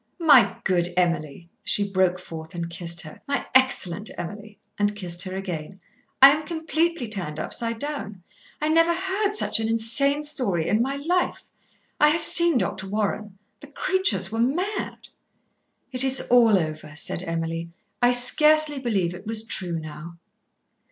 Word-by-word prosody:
"My 300 -8 +5
good 175 -2 +1
Emily," 170 -3 -1 0.2
she 205 -1 +2
broke 185 -1 +2
forth 160 -2 -10
and 170 0 -5
kissed 170 -1 -2
her. 155 - -11
"My 280 0 -2
excellent 220 -7 +2
Emily," 205 +4 -8 0.2
and 205 0 0
kissed 175 -4 -4
her 185 0 -6
again. 185 -1 -6 0.4
"I 275 - +11
am 305 +2 -1
completely 320 -3 -2
turned 175 -8 -2
upside 230 -1 -2
down. 225 - -5 0.4
I 305 - -1
never 330 +1 +3
heard 385 +3 -1
such 420 - +3
an 220 - -1
insane 245 +6 +1
story 245 - -1
in 210 +4 +1
my 270 +3 -1
life. 350 +6 -1 0.6
I 300 - +6
have 315 +2 +2
seen 340 -2 +6
Dr. 195 -4 -3
Warren. 210 -1 -3 0.2
The 290 - -13
creatures 280 - 0
were 225 - -4
mad." 350 - -2 0.8
"It 255 0 0
is 265 0 +3
all 230 -4 +5
over," 155 -3 -5
said 160 - -4
Emily. 165 -1 -4 0.3
"I 245 - +5
scarcely 300 +4 +4
believe 200 -9 -1
it 185 +4 -11
was 225 0 0
true 175 -6 -3
now." 160 +2 -9
215 Hz, 155 wpm, -23 LUFS, 175-290 Hz, 0.8 s, I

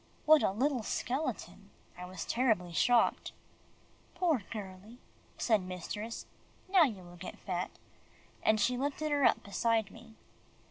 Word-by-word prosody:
What 310 0 +7
a - - +3
little 255 +6 0
skeleton! 255 +7 -3 0.3
I 180 - -7
was 185 -2 -6
terribly 220 -9 +1
shocked. 240 +8 +2 0.8
"Poor 340 - +2
girlie," 205 +1 -8 0.4
said 220 -4 +2
mistress, 185 +5 -6 0.4
"now 370 -3 +6
you 210 -9 -5
will 175 0 -13
get 180 - -8
fat," 180 -2 -3 0.7
and 220 0 +3
she 250 +4 +2
lifted 290 +3 -2
her 290 -1 +2
up - - +3
beside 220 0 0
me. 225 -1 -14
225 Hz, 135 wpm, -32 LUFS, 190-265 Hz, 0.8 s, What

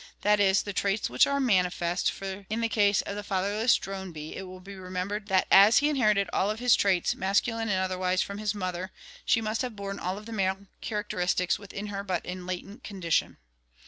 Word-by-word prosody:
That 210 0 +3
is, 195 -1 +4
the 205 - -5
traits 200 - 0
which 125 - +5
are 280 0 0
mani 190 -9 +3
fest, 175 0 -1
for 195 0 -7
in 220 +2 -1
the 230 - 0
case 205 -3 +3
of 200 - -5
the 205 - -4
fatherless 205 +4 +1
drone 190 -1 -5
bee 155 -1 -8
it 190 - -6
will 185 0 -10
be 195 +2 -11
remembered 190 +2 -4
that 190 -2 +3
as 200 +4 +8
he 295 - +4
inherited 210 -9 +2
all 195 - +1
of 215 - -2
his 245 0 +4
traits, 190 -3 +2
masculine 225 +4 0
and 190 - +1
otherwise, 185 0 0
from 200 +1 -7
his 210 -1 -1
mother, 185 -1 -3 0.4
she 225 - +3
must 220 0 -1
have 250 -4 -4
borne 200 -1 -5
all 185 +2 -3
of 210 - -10
the 230 - -9
male 195 -1 -1 0.2
characteristics 180 -5 -1
within 200 0 -7
her 200 0 -3
but 185 -4 -2
in 180 0 -6
latent 195 +6 -6
condition. 185 -5 -1
195 Hz, 215 wpm, -28 LUFS, 185-210 Hz, 0.4 s, as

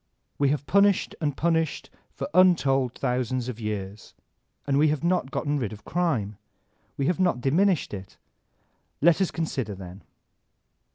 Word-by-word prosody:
We 140 -1 +3
have 145 0 -1
punished 200 0 +3
and 145 -3 -1
punished 165 -2 0 0.2
for - - -5
untold 135 -9 +3
thousands 125 -1 -1
of 120 -2 -6
years, 105 -2 -5 0.5
and 140 0 +1
we 155 - +5
have 150 0 -1
not 175 -6 +1
gotten 145 +1 -1
rid 115 -6 -3
of 110 - -11
crime, 125 - -1 0.6
we 140 - 0
have 175 +3 0
not 180 -9 +2
diminished 165 - +1
it. 95 -1 -8 0.8
Let 170 +4 +4
us 190 - +2
consider 130 - -3
then. 95 +1 -10
140 Hz, 150 wpm, -26 LUFS, 115-170 Hz, 0.8 s, we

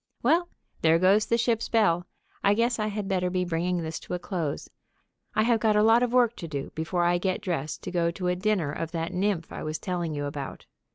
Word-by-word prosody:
Well, 335 +7 +3 0.3
there 160 0 +5
goes 195 +5 +4
the 230 - +2
ship's 230 -1 0
bell. 180 -6 +2 0.4
I 200 +1 +4
guess 235 +1 +1
I 215 - 0
had 210 -1 -3
better 185 -2 0
be 180 0 0
bringing 175 +1 -1
this 160 0 -4
to - - -5
a - - -1
close. 175 -5 -3 0.7
I 215 - +4
have 230 0 +3
got 215 -1 +2
a 210 - +4
lot 225 +2 +5
of 245 -1 +1
work 245 -2 +3
to 170 - -6
do 140 -3 -5
before 170 +2 -1
I 175 0 +3
get 185 +2 -1
dressed 160 -8 -3
to - - -5
go 170 -2 +1
to 180 +2 -4
a 180 - +2
dinner 185 -5 0
of 165 +2 -5
that 165 +2 -3
nymph 180 -2 -1
I - - -6
was 155 0 -3
telling 175 -4 -3
you 145 0 -2
about. 145 -1 -6
180 Hz, 235 wpm, -27 LUFS, 165-215 Hz, 0.7 s, there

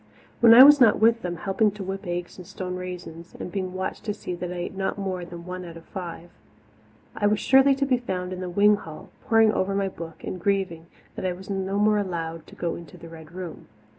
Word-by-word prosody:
When 230 -1 +8
I 255 - +12
was 290 0 +8
not 225 -4 +6
with 230 +1 +4
them, 175 -2 -3
helping 195 +4 +1
to 205 -1 -7
whip 195 +1 -5
eggs 175 +1 -4
and 180 - -10
stone 180 -1 -5
raisins, 180 -2 -8
and 180 - -6
being 185 -1 -3
watched 190 0 -4
to 210 -2 -2
see 180 - -6
that 175 0 -5
I - - -5
ate 175 +2 -5
not 190 +1 -2
more 190 -3 -3
than 170 -1 -10
one 185 0 -6
out 170 -1 -9
of 165 - -14
five, 175 -2 -8 0.8
I 205 - +1
was 210 0 +2
surely 270 +1 +5
to 275 +1 0
be 255 -2 +2
found 185 -6 -4
in 180 - -6
the 185 -1 -4
wing 205 +3 +4
hall, 165 +2 -10
poring 225 -3 +4
over 195 -1 -1
my 195 -1 0
book 165 -3 -10
and 180 - -5
grieving 185 -4 -1 0.3
that - - -7
I 180 - -1
was 190 +3 -9
no 195 0 -2
more 210 0 +3
allowed 165 -4 -4
to - - -14
go 170 -1 -2
into 170 -4 -10
the 165 - -11
Red 160 -1 -12
Room. 180 -2 -8
185 Hz, 240 wpm, -25 LUFS, 175-205 Hz, 0.8 s, I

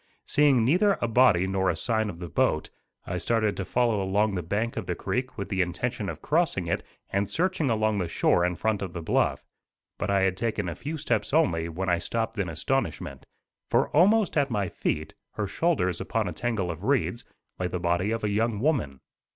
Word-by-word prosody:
Seeing 140 -6 +4
neither 190 - +3
a 120 - 0
body 115 -6 +4
nor 95 0 +1
a 85 - +1
sign 110 +5 0
of 85 - -7
the 90 0 -6
boat, 80 - 0 0.3
I - - -3
started 110 -3 +1
to 100 - -2
follow 115 -3 +1
along 100 +2 +1
the 90 - -1
bank 105 +8 -2
of - - -4
the - - -1
creek 130 +1 -3
with 100 -2 -4
the 95 -2 +1
intention 100 +4 -2
of - - -7
crossing 155 - +1
it 85 - -1 0.3
and 100 0 0
searching 170 - 0
along 110 -2 +1
the 90 - -1
shore 85 +1 +2
in 90 0 +1
front 110 +2 -1
of 95 -3 -4
the 85 - -5
bluff; - - +1 0.6
but 105 - -2
I 100 -1 +3
had 95 -1 +2
taken 105 -2 -2
a 85 - -2
few 150 - -5
steps 150 -1 -1
only 85 - +2
when 90 +4 -4
I 85 -1 +2
stopped 115 +1 -2
in 95 -4 -1
astonishment, 80 - -2 0.4
for - - +2
almost 200 +3 +4
at 140 -1 +2
my 100 -5 -1
feet, 75 +1 -2 0.2
her 105 - -2
shoulders 95 - 0
upon - - -1
a - - -3
tangle 110 -7 -1
of 85 +3 -8
reeds, 125 -2 0 0.4
lay 90 - 0
the 90 0 -3
body 85 +3 +1
of 115 0 -2
a 105 - +1
young 110 0 0
woman. 110 - 0
105 Hz, 210 wpm, -27 LUFS, 90-125 Hz, 0.6 s, Seeing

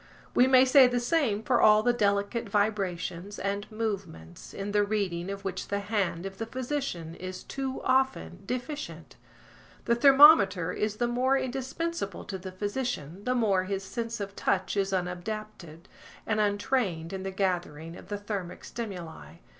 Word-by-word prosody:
We 250 - +5
may 260 0 +6
say 260 0 +7
the 245 0 0
same 240 -5 +1
for 245 0 +2
all 215 0 +6
the 245 - +3
delicate 205 +1 0
vibrations 200 -2 -1
and 200 +2 -3
movements, 195 - -5
in 200 +1 -5
the 205 0 +3
reading 195 -4 -2
of 200 0 -6
which 185 -1 -4
the 200 - -1
hand 195 -4 -1
of 195 0 -7
the 225 - -3
physician 250 - -4
is 185 +1 -7
too 270 -1 -4
often 255 - +1
deficient. 255 +5 -5 0.7
The 235 - +3
thermometer 235 - +7
is 210 +2 -2
the 240 +2 0
more 255 +3 +2
indispensable 265 - -3
to 190 -2 -5
the 185 +1 -7
physician 205 - -4
the 250 - +1
more 200 -6 +2
his 195 0 -3
sense 230 +3 -4
of 200 -1 -5
touch 190 +1 0
is 195 -1 0
unadapted 180 -2 -5 0.4
and 220 -1 0
untrained 205 -5 0
in 190 - -4
the 195 - -3
gathering 175 -4 -2
of - - -12
the 205 0 -3
thermic 200 -4 -5
stimuli. 170 - -7
205 Hz, 160 wpm, -28 LUFS, 185-240 Hz, 0.7 s, say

